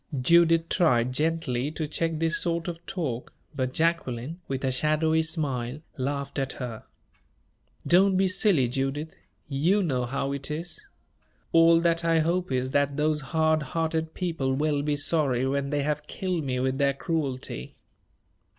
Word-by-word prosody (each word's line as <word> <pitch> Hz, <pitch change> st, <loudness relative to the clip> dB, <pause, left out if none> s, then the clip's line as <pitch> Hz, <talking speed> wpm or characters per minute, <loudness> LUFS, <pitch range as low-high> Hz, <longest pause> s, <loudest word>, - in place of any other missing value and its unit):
Judith 165 Hz, +4 st, +4 dB
tried 125 Hz, -9 st, +2 dB
gently 150 Hz, -3 st, 0 dB
to 155 Hz, 0 st, -4 dB
check 165 Hz, +1 st, -1 dB
this 165 Hz, +2 st, +1 dB
sort 170 Hz, -1 st, -1 dB
of 170 Hz, -1 st, -6 dB
talk, 140 Hz, -11 st, -4 dB, 0.2 s
but 130 Hz, -1 st, -1 dB
Jacqueline, 160 Hz, -2 st, -1 dB
with 135 Hz, 0 st, -3 dB
a 130 Hz, -, +1 dB
shadowy 155 Hz, +4 st, +2 dB
smile, 145 Hz, -5 st, -2 dB, 0.2 s
laughed 140 Hz, +1 st, -3 dB
at 135 Hz, -1 st, -2 dB
her. 120 Hz, -4 st, -7 dB, 1.0 s
"Don't 185 Hz, +2 st, +4 dB
be 190 Hz, 0 st, +3 dB
silly, 185 Hz, -, +3 dB
Judith 135 Hz, +5 st, -2 dB, 0.3 s
you 165 Hz, +9 st, +2 dB
know 130 Hz, -7 st, 0 dB
how 135 Hz, +2 st, -2 dB
it 140 Hz, 0 st, -4 dB
is. 165 Hz, +3 st, -4 dB, 0.7 s
All 165 Hz, 0 st, +6 dB
that 170 Hz, 0 st, +1 dB
I 165 Hz, -1 st, +3 dB
hope 170 Hz, +1 st, 0 dB
is, 130 Hz, 0 st, -1 dB
that 140 Hz, 0 st, +1 dB
those 150 Hz, 0 st, +1 dB
hard 160 Hz, +2 st, +1 dB
hearted 160 Hz, +2 st, -2 dB
people 160 Hz, -8 st, -1 dB
will 145 Hz, 0 st, +1 dB
be 145 Hz, 0 st, 0 dB
sorry 140 Hz, -4 st, +2 dB
when 140 Hz, +1 st, -1 dB
they 145 Hz, -1 st, 0 dB
have 150 Hz, 0 st, -2 dB
killed 180 Hz, -4 st, -2 dB
me 125 Hz, -1 st, -1 dB
with 130 Hz, +1 st, -1 dB
their 140 Hz, -1 st, +2 dB
cruelty." 140 Hz, -, -3 dB
150 Hz, 155 wpm, -26 LUFS, 135-165 Hz, 1.0 s, All